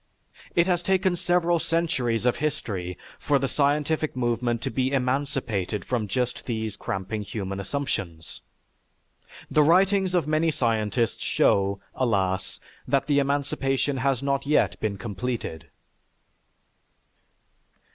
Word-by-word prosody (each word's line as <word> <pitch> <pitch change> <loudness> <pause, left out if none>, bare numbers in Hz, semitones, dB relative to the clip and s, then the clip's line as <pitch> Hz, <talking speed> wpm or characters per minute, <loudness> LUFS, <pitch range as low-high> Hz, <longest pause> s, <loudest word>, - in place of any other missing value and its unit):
It 170 - +5
has 175 -2 +1
taken 190 0 +2
several 175 -1 +2
centuries 130 -10 0
of 125 - +2
history 95 - -3 0.2
for 145 - +2
the 135 0 0
scientific 150 +2 +1
movement 120 -1 0
to - - -2
be 130 +3 0
emancipated 125 -7 -1
from 115 -4 -1
just 125 +4 -2
these 110 -3 -2
cramping 95 +1 -3
human 100 -2 -4
assumptions. 100 - -4 1.1
The 155 - +5
writings 185 +4 +4
of 170 -5 +2
many 155 +2 +2
scientists 115 -4 0
show, 100 0 +2
alas, 95 -7 0 0.3
that 140 -1 +2
the 145 -1 +3
emancipation 140 -1 0
has 135 0 0
not 140 0 0
yet 150 - +2
been 105 -2 -2
completed. 115 -5 -4
130 Hz, 115 wpm, -26 LUFS, 110-150 Hz, 1.1 s, It